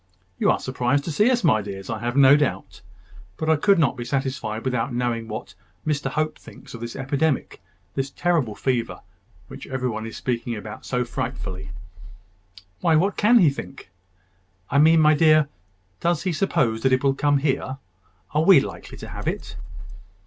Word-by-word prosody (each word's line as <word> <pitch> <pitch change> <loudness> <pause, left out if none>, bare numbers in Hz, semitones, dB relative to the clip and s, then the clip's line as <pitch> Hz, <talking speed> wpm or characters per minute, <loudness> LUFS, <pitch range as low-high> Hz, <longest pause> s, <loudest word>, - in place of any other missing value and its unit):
"You - - +3
are - - +3
surprised 130 +2 0
to 165 - -4
see 210 - +3
us, 245 -2 +1
my 110 - +4
dears, 95 -1 -7
I 115 -1 -3
have 120 +3 -3
no 140 0 +8
doubt. 130 -10 -2 0.6
But 160 0 0
I - - +5
could 195 +6 +3
not 155 -7 +2
be 120 - -5
satisfied 125 -4 -3
without 125 -1 -1
knowing 120 -2 -2
what 105 -3 -7 0.3
Mr 145 -3 -1
Hope 155 +2 -2
thinks - - -14
of 115 - -8
this 120 0 -6
epidemic, 140 +2 -1 0.3
this 135 0 -2
terrible 155 -9 0
fever, 125 -3 -2 0.5
which - - -10
every 130 -1 -2
one 110 -1 -4
is 115 - -8
speaking 120 -1 -2
about 105 0 -9
so 125 -1 0
frightfully." 115 -7 -5 1.1
"Why, 165 -2 +3
what 190 +6 +2
can 230 +4 +5
he 170 -10 +5
think?" 135 -7 -9 0.8
"I 140 - +3
mean, 160 +2 +6
my 155 0 +6
dear, 155 -1 +4 0.5
does 170 -2 0
he 185 -2 -1
suppose 120 - 0
that 130 +1 +2
it 130 - +2
will 135 -1 +3
come 145 +1 +2
here? 135 -2 -1 0.6
Are 150 +1 +2
we 185 -2 +8
likely - - -7
to - - -9
have - - -7
it?" - - -4
135 Hz, 180 wpm, -23 LUFS, 120-155 Hz, 1.1 s, no